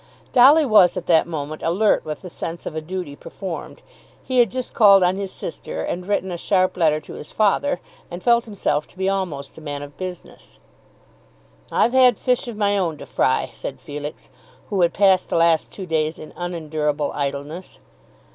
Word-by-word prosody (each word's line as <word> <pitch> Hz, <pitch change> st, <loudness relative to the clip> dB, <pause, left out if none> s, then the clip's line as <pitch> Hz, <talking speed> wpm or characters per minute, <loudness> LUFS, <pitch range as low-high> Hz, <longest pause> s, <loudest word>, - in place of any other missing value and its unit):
Dolly 280 Hz, +5 st, +7 dB
was 210 Hz, -7 st, +5 dB
at 175 Hz, -, -4 dB
that 165 Hz, -2 st, +4 dB
moment 155 Hz, -2 st, -5 dB
alert 195 Hz, +6 st, +2 dB
with 155 Hz, +2 st, -6 dB
the 180 Hz, -, -7 dB
sense 165 Hz, +1 st, -6 dB
of -, -, -5 dB
a 160 Hz, -, -2 dB
duty 175 Hz, -3 st, -5 dB
performed. 175 Hz, 0 st, -8 dB, 0.4 s
He 255 Hz, -1 st, 0 dB
had 235 Hz, -3 st, +5 dB
just 255 Hz, +5 st, -5 dB
called 200 Hz, -3 st, +6 dB
on 180 Hz, +1 st, +2 dB
his 195 Hz, -1 st, -4 dB
sister -, -, -6 dB
and 180 Hz, +1 st, -4 dB
written 195 Hz, -2 st, -1 dB
a 175 Hz, -, -4 dB
sharp 185 Hz, +1 st, +1 dB
letter 155 Hz, -4 st, +2 dB
to -, -, -11 dB
his 150 Hz, -, -9 dB
father, 220 Hz, +7 st, +1 dB, 0.3 s
and 175 Hz, +1 st, -8 dB
felt 235 Hz, -1 st, +3 dB
himself 155 Hz, -9 st, -1 dB
to -, -, -21 dB
be 190 Hz, 0 st, -1 dB
almost 175 Hz, -8 st, -3 dB
a -, -, -15 dB
man 145 Hz, -2 st, -5 dB
of 145 Hz, 0 st, -11 dB
business. 185 Hz, -2 st, -9 dB, 1.1 s
"I've 240 Hz, -, +2 dB
had 255 Hz, -4 st, +5 dB
fish 250 Hz, -1 st, 0 dB
of 235 Hz, -3 st, -6 dB
my 205 Hz, -1 st, +2 dB
own 165 Hz, -5 st, -1 dB
to -, -, -10 dB
fry," -, -, 0 dB
said -, -, -7 dB
Felix, 150 Hz, +1 st, -8 dB, 0.4 s
who 195 Hz, -3 st, +1 dB
had 170 Hz, -1 st, +2 dB
passed 190 Hz, -2 st, +3 dB
the -, -, -1 dB
last 165 Hz, -1 st, +3 dB
two 190 Hz, -, -7 dB
days 160 Hz, -1 st, -1 dB
in 155 Hz, -, -11 dB
unendurable 155 Hz, -4 st, -2 dB
idleness. 145 Hz, +5 st, -5 dB
180 Hz, 190 wpm, -22 LUFS, 155-200 Hz, 1.1 s, Dolly